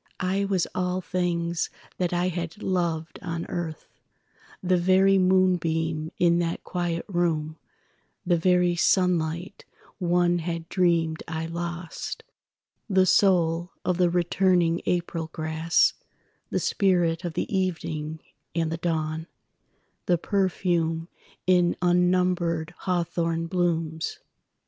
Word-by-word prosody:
I 195 Hz, +2 st, +1 dB
was 190 Hz, -3 st, +1 dB
all 180 Hz, 0 st, -1 dB
things 170 Hz, -2 st, -1 dB, 0.3 s
that 180 Hz, -2 st, 0 dB
I 175 Hz, +1 st, +1 dB
had 170 Hz, +2 st, -5 dB
loved 170 Hz, -3 st, -1 dB
on 170 Hz, -2 st, -4 dB
earth—The 175 Hz, +2 st, -5 dB
very 190 Hz, +2 st, +4 dB
moonbeam 165 Hz, -4 st, +1 dB
in 170 Hz, -1 st, +3 dB
that 170 Hz, -1 st, -2 dB
quiet 175 Hz, -2 st, -2 dB
room, 165 Hz, -4 st, -1 dB, 0.7 s
The 175 Hz, -1 st, +3 dB
very 180 Hz, +1 st, +3 dB
sunlight 175 Hz, 0 st, +1 dB, 0.4 s
one 175 Hz, -1 st, +2 dB
had 165 Hz, 0 st, -4 dB
dreamed 170 Hz, -3 st, +1 dB
I 160 Hz, 0 st, -3 dB
lost, 170 Hz, 0 st, -5 dB, 0.7 s
The 190 Hz, -1 st, +4 dB
soul 175 Hz, -3 st, +3 dB
of 180 Hz, -2 st, +1 dB
the 180 Hz, -1 st, +4 dB
returning 175 Hz, -1 st, +2 dB
April 170 Hz, -2 st, -1 dB
grass, 160 Hz, +1 st, +2 dB, 0.6 s
The -, -, 0 dB
spirit 175 Hz, -3 st, +1 dB
of 175 Hz, -2 st, -3 dB
the -, -, -2 dB
evening 160 Hz, -4 st, -2 dB, 0.3 s
and 165 Hz, -1 st, 0 dB
the 165 Hz, -, -2 dB
dawn, 160 Hz, -1 st, -2 dB, 0.8 s
The 175 Hz, -, +4 dB
perfume 175 Hz, -3 st, 0 dB, 0.4 s
in 180 Hz, -1 st, +3 dB
unnumbered 180 Hz, -2 st, +1 dB
hawthorn 170 Hz, -2 st, -1 dB
blooms. 165 Hz, -2 st, -1 dB
175 Hz, 110 wpm, -26 LUFS, 165-180 Hz, 0.8 s, very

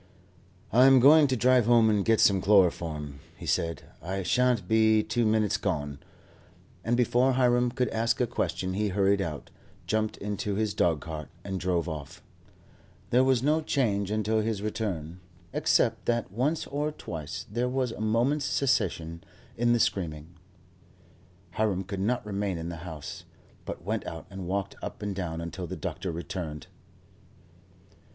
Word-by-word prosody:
"I 125 Hz, +4 st, +6 dB
am 135 Hz, -1 st, +7 dB
going 145 Hz, +4 st, +7 dB
to 130 Hz, -, 0 dB
drive 125 Hz, -1 st, +4 dB
home 120 Hz, -2 st, +5 dB
and 105 Hz, -2 st, +2 dB
get 115 Hz, +1 st, +3 dB
some 95 Hz, -2 st, +4 dB
chloroform," 85 Hz, -7 st, +2 dB, 0.2 s
he -, -, -9 dB
said, 85 Hz, 0 st, -1 dB, 0.2 s
"I 95 Hz, +4 st, -3 dB
shan't 115 Hz, +2 st, +2 dB
be 110 Hz, 0 st, +4 dB
two 120 Hz, 0 st, 0 dB
minutes 110 Hz, 0 st, +2 dB
gone;" 75 Hz, -8 st, -3 dB, 0.8 s
and 120 Hz, +2 st, +1 dB
before 125 Hz, +2 st, +3 dB
Hiram 125 Hz, -1 st, +3 dB
could 125 Hz, +1 st, -1 dB
ask 115 Hz, +1 st, 0 dB
a 125 Hz, -, +3 dB
question 95 Hz, -5 st, -2 dB
he 105 Hz, +2 st, 0 dB
hurried 100 Hz, 0 st, +2 dB
out, 80 Hz, -5 st, -5 dB, 0.3 s
jumped 110 Hz, 0 st, -1 dB
into 105 Hz, 0 st, -3 dB
his 105 Hz, -1 st, 0 dB
dogcart, 80 Hz, -2 st, -1 dB
and 95 Hz, -1 st, -4 dB
drove 90 Hz, -2 st, 0 dB
off. 75 Hz, -4 st, -7 dB, 0.9 s
There 125 Hz, +2 st, +5 dB
was 130 Hz, -2 st, +2 dB
no 155 Hz, +3 st, +2 dB
change 105 Hz, -10 st, 0 dB
until 110 Hz, +1 st, 0 dB
his 105 Hz, -2 st, -2 dB
return, 95 Hz, -6 st, -3 dB, 0.3 s
except -, -, +1 dB
that 120 Hz, -5 st, 0 dB
once 135 Hz, +10 st, 0 dB
or 145 Hz, +2 st, -2 dB
twice 80 Hz, -, -6 dB
there 120 Hz, +3 st, 0 dB
was 130 Hz, -2 st, -1 dB
a 110 Hz, -, -7 dB
moment's 120 Hz, +7 st, +1 dB
cessation 85 Hz, -, 0 dB, 0.3 s
in 120 Hz, +1 st, +2 dB
the 120 Hz, -, +3 dB
screaming. 80 Hz, -5 st, -1 dB, 1.2 s
Hiram 100 Hz, -2 st, 0 dB
could 95 Hz, +1 st, -5 dB
not 115 Hz, +4 st, 0 dB
remain 100 Hz, -3 st, -2 dB
in 80 Hz, +1 st, -5 dB
the 85 Hz, -, -6 dB
house, 80 Hz, -3 st, -8 dB, 0.4 s
but -, -, -6 dB
went -, -, -3 dB
out 80 Hz, -, -7 dB
and 95 Hz, -2 st, -6 dB
walked 100 Hz, +1 st, -2 dB
up -, -, -7 dB
and 105 Hz, -1 st, -2 dB
down 85 Hz, -3 st, -3 dB
until 85 Hz, +2 st, -5 dB
the -, -, -5 dB
doctor 95 Hz, -, -4 dB
returned. 80 Hz, -2 st, -5 dB
105 Hz, 160 wpm, -28 LUFS, 90-120 Hz, 1.2 s, am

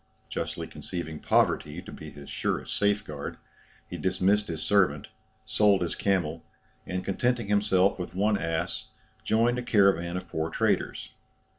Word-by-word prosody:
Justly -, -, -3 dB
conceiving 80 Hz, -3 st, -6 dB
poverty 75 Hz, +3 st, +2 dB
to 95 Hz, +4 st, -10 dB
be 75 Hz, -, -9 dB
his 70 Hz, -1 st, -12 dB
surest -, -, -2 dB
safe 100 Hz, 0 st, +2 dB
guard, 75 Hz, -2 st, -6 dB, 0.5 s
he -, -, -6 dB
dismissed 95 Hz, +3 st, +2 dB
his 80 Hz, -2 st, -4 dB
servant, 90 Hz, -7 st, +2 dB, 0.4 s
sold 100 Hz, -3 st, +3 dB
his 85 Hz, -, -2 dB
camel, 85 Hz, -5 st, 0 dB, 0.4 s
and 90 Hz, 0 st, -3 dB
contenting 120 Hz, +2 st, 0 dB
himself 100 Hz, -2 st, +3 dB
with 90 Hz, 0 st, -5 dB
one 105 Hz, +2 st, +3 dB
ass, 80 Hz, -4 st, -2 dB, 0.4 s
joined 120 Hz, +3 st, +2 dB
a -, -, -2 dB
caravan 95 Hz, -6 st, +3 dB
of 90 Hz, -, -6 dB
poor 80 Hz, 0 st, -2 dB
traders. -, -, 0 dB
95 Hz, 145 wpm, -28 LUFS, 80-105 Hz, 0.5 s, sold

